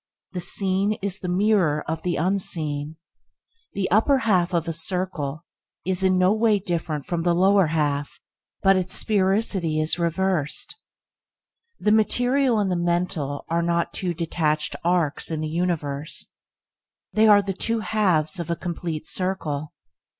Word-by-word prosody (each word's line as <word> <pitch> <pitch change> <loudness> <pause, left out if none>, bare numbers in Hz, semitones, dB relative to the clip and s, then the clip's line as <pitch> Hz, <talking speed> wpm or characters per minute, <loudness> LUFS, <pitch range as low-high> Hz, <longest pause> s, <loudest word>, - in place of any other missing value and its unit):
The 180 - -4
seen 195 +3 +4
is 200 0 -2
the 185 - -6
mirror 180 -5 +1
of 160 +1 -3
the 175 -2 -2
unseen. 160 -4 +1 0.8
The 195 -3 -2
upper 225 +8 +4
half 190 -8 +1
of 170 -1 -1
a 165 - -2
circle 165 -3 -3 0.4
is 185 0 +1
in 185 -1 +2
no 185 +2 +3
way 220 -1 +2
different 165 -6 -3
from 170 -2 -2
the 170 0 +1
lower 190 0 +4
half, 145 -2 -2 0.4
but 195 0 +5
its 185 -1 0
sphericity 190 -5 +1
is 155 +3 +2
reversed. 170 -2 -1 1.0
The 210 - +1
material 245 +3 +2
and 200 -3 0
the - - 0
mental 170 -5 -2
are 170 +1 0
not 170 0 -1
two 180 -2 -3
detached 155 -2 -1
arcs 170 -4 0
in 160 -2 -3
the 155 - -3
universe, 155 -3 -2 0.8
they 220 0 +4
are 205 -1 +6
the 195 0 -3
two 225 +4 -2
halves 185 -7 +1
of 170 - -5
a 170 - 0
complete 170 -3 -5
circle. 155 -5 -2
175 Hz, 150 wpm, -23 LUFS, 160-195 Hz, 1.0 s, are